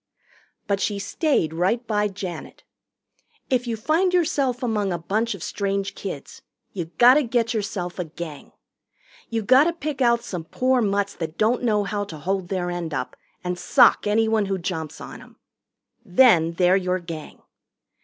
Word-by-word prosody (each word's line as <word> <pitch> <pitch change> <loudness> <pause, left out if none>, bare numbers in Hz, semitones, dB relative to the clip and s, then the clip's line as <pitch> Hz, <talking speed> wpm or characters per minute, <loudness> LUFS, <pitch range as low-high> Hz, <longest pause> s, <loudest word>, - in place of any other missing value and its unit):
But 200 -1 0
she 205 +1 -1
stayed 200 - 0
right 190 +9 0
by 210 -2 +1
Janet. 185 -5 -7 0.9
If 250 -1 +1
you 230 -1 -2
find 330 - +1
yourself 275 -7 +1
among 210 -5 0
a 175 - -1
bunch 215 +6 -1
of 185 - -9
strange 200 -1 -2
kids, 180 -8 -7 0.3
you 175 -4 -3
gotta 255 +5 +7
get 235 -3 0
yourself 200 -5 -3
a 180 - -1
Gang. 160 -2 -9 0.8
You 225 -1 -2
gotta 265 +9 +5
pick 300 -4 -5
out 235 -1 +3
some 175 -8 -5
poor 255 +7 +1
mutts 200 -1 0
that 160 -1 -6
don't 225 +3 +2
know 215 -4 +2
how 205 0 -2
to 165 -6 -9
hold 185 +4 -2
their 180 -1 -2
end 170 -3 -4
up 125 - -4 0.3
and 180 0 -3
sock 180 - +4
anyone 220 0 +2
who 195 0 -1
jumps 165 -4 -5
on - - -9
'em. - - -16 0.7
Then 180 -6 +4
they're 180 +2 +3
your 185 -1 0
Gang. 165 -4 -9
200 Hz, 165 wpm, -23 LUFS, 180-235 Hz, 0.9 s, gotta